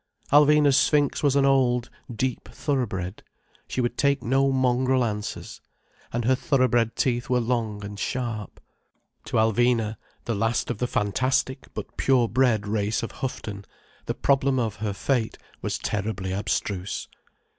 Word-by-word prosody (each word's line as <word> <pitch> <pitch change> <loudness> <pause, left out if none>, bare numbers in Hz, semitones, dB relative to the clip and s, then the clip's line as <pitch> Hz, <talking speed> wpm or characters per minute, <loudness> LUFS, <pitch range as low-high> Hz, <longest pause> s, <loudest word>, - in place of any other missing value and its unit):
Alvina's 145 -1 +6
sphinx 145 -2 +2
was 145 -2 +2
an 140 -1 +4
old, 125 -3 +2 0.2
deep 125 -2 -2
thoroughbred, 110 - -2 0.5
she 130 - -2
would 120 0 -2
take 140 0 +2
no 135 +3 +2
mongrel 130 0 +2
answers. 105 -2 -5 0.5
And 120 -1 -2
her 130 - +4
thoroughbred 125 -3 +2
teeth 120 -2 0
were 125 -1 +3
long 115 -4 -2
and 100 0 -7
sharp. 115 -4 -3 0.7
To - - -2
Alvina, 115 0 +2 0.3
the 115 - -1
last 115 +3 0
of 110 - -5
the 125 - 0
fantastic 130 +4 0
but - - -7
pure 130 -3 +3
bred 115 -4 +2
race 105 +1 -1
of 115 - -4
Houghton, 105 -6 -5 0.4
the - - -1
problem 135 -1 +2
of 115 -4 -1
her 105 -1 -2
fate 120 +2 -1 0.2
was - - -2
terribly 100 -2 -3
abstruse. 100 -1 -2
120 Hz, 145 wpm, -25 LUFS, 110-130 Hz, 0.7 s, Alvina's